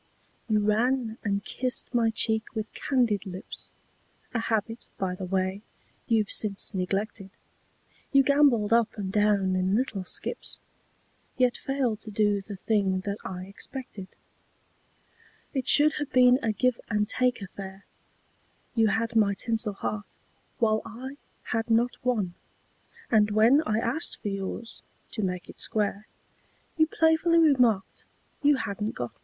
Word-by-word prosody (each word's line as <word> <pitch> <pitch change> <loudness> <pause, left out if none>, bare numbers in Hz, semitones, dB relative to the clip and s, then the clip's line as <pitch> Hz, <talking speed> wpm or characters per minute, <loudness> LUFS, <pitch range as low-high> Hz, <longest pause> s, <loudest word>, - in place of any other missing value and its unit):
You 215 -1 +3
ran 225 +2 +1
and 200 -1 -1
kissed 255 0 -3
my 235 -2 +3
cheek 220 0 0
with 215 -1 -4
candied 240 -8 +1
lips, 185 0 -8 0.6
A 235 - 0
habit, 225 0 -2
by 190 -2 -1
the 185 +1 -5
way, 190 +1 -1 0.5
you've 220 -3 +2
since 205 0 +1
neglected; 195 +2 -2 0.8
You 275 -1 +6
gambolled 265 -6 +4
up 230 -1 +2
and 195 -2 -3
down 205 -2 +2
in 185 +2 +1
little 220 -5 -1
skips, 470 - -3 0.8
Yet 250 -1 +3
failed 255 -6 -1
to 220 - -8
do 205 -1 +1
the 200 +1 -8
thing 190 -1 +1
that 200 +1 -4
I 185 -1 -5
expected. 200 0 -8 1.5
It 265 -3 -2
should 305 +1 +5
have 290 - -4
been 250 0 +6
a 225 - +1
give 250 +3 +1
and 210 -1 +1
take 250 +2 +1
affair; 195 0 -9 0.9
You 225 -2 +3
had 230 +3 0
my 205 -3 +4
tinsel 225 0 0
heart, 205 +1 -5 0.4
while 220 -3 +2
I 260 +5 -8 0.3
had 225 0 -1
not 235 +2 +1
one, 215 -8 0 0.8
And 210 -2 +5
when 225 +7 +5
I 215 - +1
asked 235 +8 -1
for 205 - -1
yours, 195 +3 -5 0.3
to 220 - -3
make 180 -2 -2
it - - -12
square, 210 -1 -1 0.7
You 315 -1 +4
playfully 320 +1 +3
remarked 250 -11 +3 0.4
you 290 -1 +5
hadn't 210 -3 -3
got 120 -1 -4
one. - - -35
220 Hz, 145 wpm, -27 LUFS, 200-245 Hz, 1.5 s, You